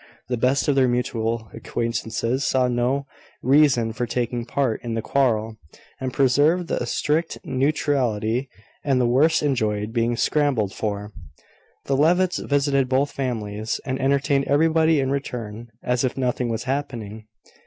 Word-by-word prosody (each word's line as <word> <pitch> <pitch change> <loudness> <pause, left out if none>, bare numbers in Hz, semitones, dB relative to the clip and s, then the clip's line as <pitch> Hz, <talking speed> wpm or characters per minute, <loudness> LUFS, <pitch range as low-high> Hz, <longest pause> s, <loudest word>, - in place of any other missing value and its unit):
The 125 - +1
best 130 +4 +1
of 145 - +4
their 135 -2 +3
mutual 115 -2 -1
acquaintances 115 +2 -2
saw 130 -2 +2
no 125 +3 0 0.4
reason 130 -4 +4
for 120 +2 -2
taking 120 0 -2
part 125 -2 -1
in 115 -2 -3
the 115 - -1
quarrel, 115 -5 +1 0.4
and 130 -1 -3
preserved 145 +7 +2
a 120 - -1
strict 155 +6 0
neutrality; 130 -4 0 0.3
and 135 -3 +2
the 125 - +3
worst 145 +8 +3
enjoyed 110 -6 0
being 120 0 +1
scrambled 130 -11 +1
for. 105 -1 -4 0.7
The 135 - 0
Levitts 175 +5 +3
visited 140 -2 +1
both 135 +2 +1
families, 110 -5 -3
and 130 0 -2
entertained 140 +1 +2
everybody 160 +1 +3
in 135 -1 0
return, 120 -5 -4 0.2
as 125 0 0
if 130 0 -1
nothing 125 -1 -1
was 115 -1 -2
happening. 115 -6 -4
125 Hz, 145 wpm, -23 LUFS, 115-140 Hz, 0.7 s, of